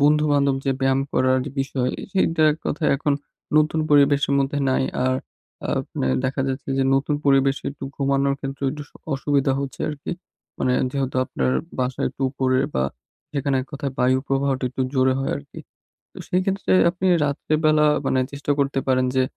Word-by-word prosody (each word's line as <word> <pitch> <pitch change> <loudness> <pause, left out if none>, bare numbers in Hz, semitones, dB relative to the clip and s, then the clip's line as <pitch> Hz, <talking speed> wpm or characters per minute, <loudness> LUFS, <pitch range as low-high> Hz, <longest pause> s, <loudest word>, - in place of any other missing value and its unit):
বন্ধু-বান্ধব 145 -2 +3
যে, 135 - +1
ব্যায়াম 135 0 +2
করার 130 0 +3 0.2
বিষয় 130 -2 0 0.2
সেইটার 160 -5 +3
কথা 150 +1 -2
এখন 145 0 0 0.4
নতুন 155 +1 +3
পরিবেশের 140 -1 +4
মধ্যে 140 +1 0
নাই। 130 - +2 0.2
আর 130 0 +2 0.7
আপনে - - -4 0.2
দেখা 135 +1 -1
যাচ্ছে 135 +1 -4
যে, - - +3
নতুন 140 +2 +1
পরিবেশে 135 -1 +3
একটু 135 - -8
ঘুমানোর 140 0 +1
ক্ষেত্রে 135 0 -6
একটু 150 +1 -6 0.3
অসুবিধা 140 -1 +1
হচ্ছে 140 -1 -6
আরকি। 150 -1 -5 0.5
মানে 125 - +1 0.2
যেহেতু 135 -2 -2
আপনার 130 - -1 0.3
বাসায় 125 0 -1
একটু 135 +1 -7
উপরে 130 -1 +1 0.2
বা 65 - +1 0.5
সেখানে 140 -1 0
এক 130 - -7
কথায় 140 -1 -3
বায়ু 130 +1 +3
প্রবাহটা 135 -1 0
একটু 130 - -2
জোরে 130 0 +3
হয় 135 - -1
আরকি। 140 0 -11 0.5
তো - - -20
সেই 180 +1 +1
ক্ষেত্রে 195 0 -1 0.2
আপনি 180 +2 -4 0.2
রাত্রে 145 +2 -2
বেলা 155 0 +5 0.2
মানে 130 - +2
চেষ্টা 140 +1 -2
করতে 140 -1 +1
পারেন 130 -1 +3
যে, 130 - +4
140 Hz, 165 wpm, -23 LUFS, 130-145 Hz, 0.7 s, বেলা